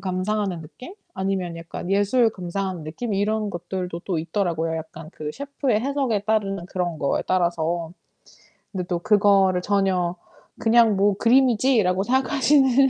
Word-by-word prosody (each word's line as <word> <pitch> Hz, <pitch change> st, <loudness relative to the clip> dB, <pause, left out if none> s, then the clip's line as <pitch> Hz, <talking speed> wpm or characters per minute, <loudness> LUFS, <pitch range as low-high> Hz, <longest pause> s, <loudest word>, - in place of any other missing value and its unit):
감상하는 185 Hz, -1 st, -2 dB
느낌? 250 Hz, -, -12 dB, 0.2 s
아니면 190 Hz, -3 st, -2 dB
약간 165 Hz, +2 st, -7 dB
예술 205 Hz, +4 st, +3 dB
감상하는 185 Hz, -3 st, -4 dB
느낌? 190 Hz, +9 st, -5 dB
이런 210 Hz, +1 st, 0 dB
것들도 175 Hz, -1 st, -5 dB
또 180 Hz, -4 st, -1 dB
있더라고요 165 Hz, -2 st, -1 dB
약간 160 Hz, 0 st, -8 dB
그 150 Hz, -1 st, -5 dB
셰프의 275 Hz, -, -1 dB
해석에 265 Hz, -4 st, 0 dB
따르는 200 Hz, -4 st, -1 dB
그런 175 Hz, -3 st, -3 dB
거에 140 Hz, -, 0 dB
따라서. 170 Hz, -2 st, 0 dB, 0.8 s
근데 185 Hz, -3 st, -3 dB
또 175 Hz, -1 st, -1 dB
그거를 195 Hz, -2 st, +3 dB
전혀 185 Hz, -3 st, +1 dB, 0.4 s
'그냥 225 Hz, -2 st, +4 dB
뭐 200 Hz, 0 st, +3 dB
그림이지.'라고 235 Hz, -6 st, +3 dB
생각하시는 265 Hz, +1 st, +3 dB
195 Hz, 330 characters per minute, -23 LUFS, 175-220 Hz, 0.8 s, 그냥